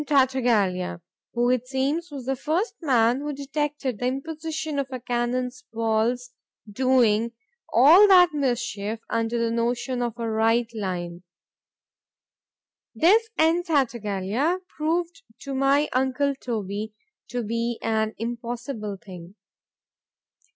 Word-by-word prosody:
Tartaglia_, 240 - +1 0.4
who 240 +1 +2
it 250 -1 0
seems 275 +6 -1
was 275 -4 -7
the 270 +1 0
first 320 - -1
man 245 -4 +3
who 295 +1 -3
detected 280 -3 -3
the 245 - 0
imposition 310 +2 -3
of 275 - -1
a 255 - -4
cannon 245 +1 -1 0.2
ball's 230 +2 0 0.4
doing 230 -1 +2 0.4
all 320 - +8
that 360 -4 +7
mischief 240 -6 -2
under 230 +1 0
the 230 0 0
notion 240 +2 -1
of 240 -1 -2
a 230 -1 -3
right 225 +2 +2
line—This 185 - -4
N. 325 +2 +3
Tartaglia 250 - 0
proved 335 +4 -1 0.2
to 275 - -5
my 275 +2 +3
uncle 265 +2 +1
Toby 215 -4 -4 0.3
to 245 -1 -3
be 230 +2 -2
an 220 -1 0
impossible 235 -2 -5
thing. 180 -1 -11
245 Hz, 115 wpm, -25 LUFS, 225-285 Hz, 0.4 s, all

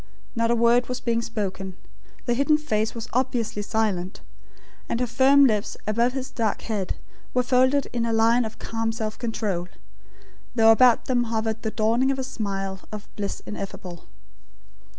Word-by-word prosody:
Not 230 0 +1
a 235 - +3
word 235 +2 +3
was 250 0 -2
being 230 -1 0
spoken. 190 -5 -4 0.5
The 240 - +1
hidden 280 +5 +3
face 220 -7 -1
was 230 -1 -5
obviously 240 -4 0
silent; 205 -4 -1 0.7
and 230 - -1
her 250 - +2
firm 265 +4 +5
lips 215 -5 0
above 235 +4 +1
his 265 -1 -4
dark 225 -4 -1
head 205 -5 -2 0.4
were 250 - +3
folded 260 +2 +3
in 235 -1 0
a - - 0
line 230 +2 +4
of 220 -1 -6
calm 225 0 -2
self 220 -1 -4
control; 210 -7 -2 0.9
though 225 -1 +7
about 245 +1 +5
them 245 -2 +1
hovered 225 -1 -2
the 220 - -1
dawning 230 +4 +2
of 270 - 0
a 265 - -2
smile 195 -6 -3
of 210 -1 -7
bliss 200 -1 -4
ineffable. 190 -4 -7
230 Hz, 165 wpm, -25 LUFS, 215-245 Hz, 0.9 s, though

